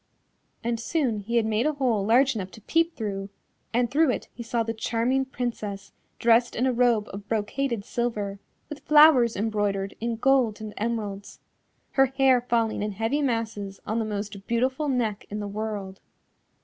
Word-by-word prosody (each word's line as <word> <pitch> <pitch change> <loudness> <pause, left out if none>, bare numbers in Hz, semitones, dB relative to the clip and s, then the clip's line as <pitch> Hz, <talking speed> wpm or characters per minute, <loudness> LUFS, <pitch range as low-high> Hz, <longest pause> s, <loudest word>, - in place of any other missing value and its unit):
And 230 0 -1
soon 250 -4 0
he 225 +4 -4
had 230 -2 +3
made 220 +5 +1
a 305 - +1
hole 250 -8 +1
large 255 +6 +4
enough 195 -5 -4
to 220 - -12
peep 330 +8 +1
through, 200 -3 -4 0.4
and 240 0 +1
through 305 +2 +4
it 250 - -2
he 235 - -9
saw 230 0 -1
the 225 0 -3
charming 235 +4 0
Princess 230 -6 -5 0.3
dressed 235 +1 +3
in 250 - +1
a 260 - +2
robe 235 -3 +2
of 200 +1 -8
brocaded 225 +1 -1
silver, 210 -5 -2 0.3
with 300 - -8
flowers 295 -6 +6
embroidered 205 -2 -1
in 235 0 -2
gold 245 -3 +2
and 215 -1 -7
emeralds, 210 -3 -4 0.5
her 270 0 +4
hair 265 -1 +3
falling 230 -3 0
in 210 0 -2
heavy 225 +8 0
masses 220 -6 -2
on 220 +2 -1
the 225 - -1
most 205 -1 -5
beautiful 260 +5 0
neck 225 -6 -1
in 210 - -4
the 205 - -4
world. 205 -2 -5
230 Hz, 175 wpm, -26 LUFS, 210-250 Hz, 0.5 s, flowers